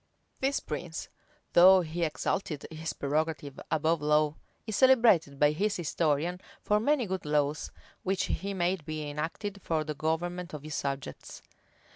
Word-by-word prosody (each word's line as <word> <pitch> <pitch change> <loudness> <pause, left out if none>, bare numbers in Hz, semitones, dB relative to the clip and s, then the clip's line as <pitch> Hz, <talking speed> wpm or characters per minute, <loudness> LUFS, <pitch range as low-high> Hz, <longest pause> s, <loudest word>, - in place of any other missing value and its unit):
This 275 +1 +1
prince, 160 +2 -5 0.4
though 185 +2 +8
he 170 +1 -3
exalted 160 -1 -2
his 160 0 -4
prerogative 150 -1 -2
above 160 0 +1
law 150 0 +2 0.3
is 220 - -3
celebrated 230 - +5
by 145 +1 +4
his 200 +7 0
historian 165 +1 0 0.2
for 210 0 +3
many 270 +2 +2
good 190 -2 -3
laws, 150 0 0 0.3
which 190 0 0
he 200 +2 -2
made 180 -1 0
be 155 0 -4
enacted 165 +7 -4
for 160 -2 0
the 155 0 -4
government 165 +3 -2
of 145 - -8
his 155 0 -6
subjects. 140 -1 -5
160 Hz, 145 wpm, -29 LUFS, 150-190 Hz, 0.4 s, though